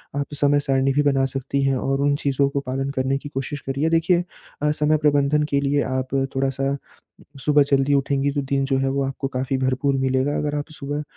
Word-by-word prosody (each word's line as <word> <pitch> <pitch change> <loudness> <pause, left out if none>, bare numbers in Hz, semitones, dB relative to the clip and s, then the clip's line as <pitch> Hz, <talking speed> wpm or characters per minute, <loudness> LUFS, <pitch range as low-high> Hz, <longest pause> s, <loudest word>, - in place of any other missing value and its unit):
आप 140 0 -1 0.2
समय 145 0 +4
सारणी 135 -1 +1
भी 145 - +3
बना 135 -2 +2
सकती 135 +1 -2
हैं 135 0 +2
और 135 +2 -1
उन 145 0 +2
चीज़ों 140 0 +2
को 140 - -1
पालन 135 0 -3
करने 130 +1 0
की 145 +1 -8
कोशिश 140 +1 -4
करिए। 140 +4 -1
देखिए 165 +2 +2 0.4
अ, 150 - +2
समय 150 +1 +2
प्रबंधन 145 0 +2
के 140 - +2
लिए 145 +1 +1
आप 130 0 -3 0.2
थोड़ा-सा 135 +1 0 0.7
सुबह 150 -1 +5
जल्दी 140 0 +3
उठेंगी 140 0 +1
तो 145 0 -1
दिन 135 0 0
जो 135 -1 +1
है 135 0 +1
वो 140 +1 0
आपको 135 0 -3
काफ़ी 130 +1 -2
भरपूर 130 +1 +1
मिलेगा। 130 +2 +1
अगर 150 0 -1
आप 145 +2 -4
सुबह 145 0 -4
140 Hz, 210 wpm, -22 LUFS, 135-145 Hz, 0.7 s, सुबह